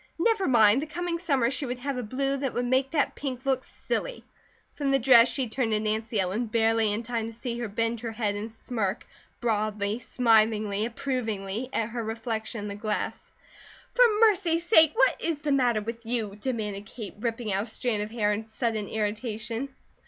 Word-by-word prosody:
Never 400 +2 +2
mind! 230 -1 +5
The 310 - -4
coming 340 +2 -3
summer 275 -8 +1
she 275 +1 -3
would 245 +1 -3
have 275 +2 -3
a 250 - -2
blue 270 +4 -1
that 270 -2 -3
would 245 - 0
make 260 +2 +2
that 295 -2 +1
pink 260 -2 -5
look 265 -1 +1
silly. - - -4 0.5
From 285 -2 -2
the 275 - +4
dress 240 -2 +7
she 260 -1 -1
turned 225 0 -1
to 210 - +3
Nancy 220 +1 -1
Ellen, 195 +6 0
barely 225 -1 +2
in 215 +3 -2
time 230 -1 -2
to - - -6
see 235 +1 -5
her 240 - -2
bend 230 +2 -1
her 230 0 -4
head 215 -2 0
and 210 +2 -5
smirk, 220 -3 -3 0.4
broadly, 215 -2 0
smilingly, 220 -3 +2
approvingly, 230 -3 -3
at 225 -3 -1
her 235 0 -4
reflection 220 0 -4
in 205 - -5
the 200 - -4
glass. 210 +1 -3 0.6
"For - - +1 0.2
mercy 375 -7 +4
sake, 320 -3 +5
what - - +3
IS 320 -3 -1
the 300 -1 -1
matter 245 -5 +3
with 230 +2 -6
you?" 225 -4 -2
demanded 210 -3 -4
Kate, 215 -3 -8
ripping 230 -2 -2
a 195 +1 +1
strand 220 -1 -1
of 210 - -4
hair 210 -2 +1
in 210 +2 -3
sudden 220 -1 -2
irritation. 220 +3 -3
230 Hz, 190 wpm, -27 LUFS, 215-260 Hz, 0.6 s, dress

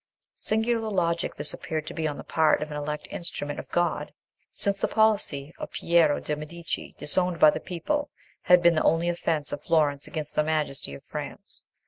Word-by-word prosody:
Singular 225 0 +1
logic 170 -4 0
this 145 +1 -1
appeared 155 -1 -4
to - - -6
be 160 -1 -1
on 145 - -4
the - - -7
part 155 -2 +2
of 150 - -8
an 150 - -4
elect 150 0 -4
instrument 145 -4 -4
of - - -9
God! 175 0 0 0.4
since 200 -1 0
the - - +1
policy 200 -10 +2
of - - -5
Piero 165 -3 +3
de' 150 - -2
Medici, 160 +2 -6
disowned 180 +2 0
by 155 - +8
the - - -3
people, 290 - -2 0.3
had 180 -1 +5
been 170 0 +6
the 155 - +1
only 165 +2 +3
offence 160 -3 -1
of 145 - -4
Florence 145 -3 +2
against 155 -4 -5
the 150 - +2
majesty 150 - -1
of - - -12
France. - - -8
160 Hz, 190 wpm, -26 LUFS, 150-175 Hz, 0.4 s, by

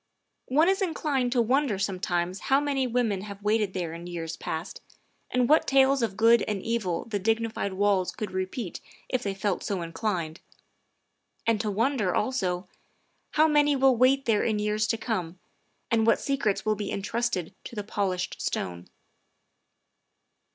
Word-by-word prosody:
One 305 +6 +4
is 385 +1 +2
inclined 290 -8 0
to 240 -2 +3
wonder 255 -2 +1
sometimes 185 -2 -1
how 270 +1 +5
many 280 -3 0
women 230 -5 0
have 200 0 -9
waited 210 -2 +1
there 170 -3 -2
in 170 +1 -8
years 165 -2 -5
past, 160 +4 -5 0.5
and 250 -1 +2
what 310 +4 +4
tales 270 0 +4
of 210 -4 -1
good 230 +1 +6
and 210 -2 -1
evil 215 -7 -1
the 210 -3 -2
dignified 225 -1 -1
walls 195 -1 +2
could 210 -3 -5
repeat 185 +2 -4 0.3
if 255 - 0
they 200 -4 -3
felt 195 -1 -1
so 190 -4 -2
inclined; 170 -2 -3 1.1
and 225 -2 +2
to 215 - -2
wonder, 215 -2 +1
also, 185 -8 -1 0.7
how 310 +1 +5
many 295 -1 +4
will 265 -1 +4
wait 260 +3 +3
there 220 -3 +3
in 220 -2 +1
years 210 +1 0
to 225 - 0
come, 185 -7 -3 0.5
and 225 -1 +3
what 230 - +4
secrets 270 -9 0
will 215 - +3
be 205 -1 -4
entrusted 205 -3 -2
to - - -8
the 210 - -3
polished 195 -3 -2
stone. 90 0 -3
215 Hz, 160 wpm, -27 LUFS, 190-250 Hz, 1.1 s, good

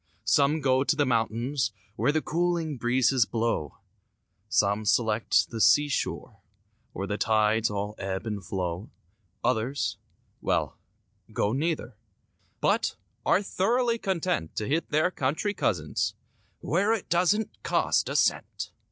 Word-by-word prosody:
Some 145 +2 +3
go 130 -1 +3
to 155 +2 +1
the 145 -1 +2
mountains 120 +1 0 0.2
Where 145 - +2
the 155 +1 0
cooling 170 -2 0
breezes 125 0 +2
blow; 115 - -1 0.7
Some 105 -1 +2
select 110 +2 +2
the 115 -1 -3
seashore 145 -7 +2 0.5
Where 95 - -4
the 105 +1 -3
tides 110 0 +2
all 105 0 -3
ebb 95 +1 -3
and 105 -3 -4
flow; 90 +1 -3 0.5
Others,—well, 125 +3 -2 0.6
go 105 - 0
neither 140 -5 -2 0.6
But - - +1 0.3
are 200 - +4
thoroughly 235 +5 +1
content 180 - -1
To 105 - -2
hit 160 +3 0
their 155 +4 +2
country 160 +8 -1
cousins— 80 - -1 0.5
"Where 200 +7 +2
it 220 - -3
doesn't 185 +5 +1
cost - - +1
a - - -3
cent." - - 0
130 Hz, 125 wpm, -27 LUFS, 110-160 Hz, 0.7 s, are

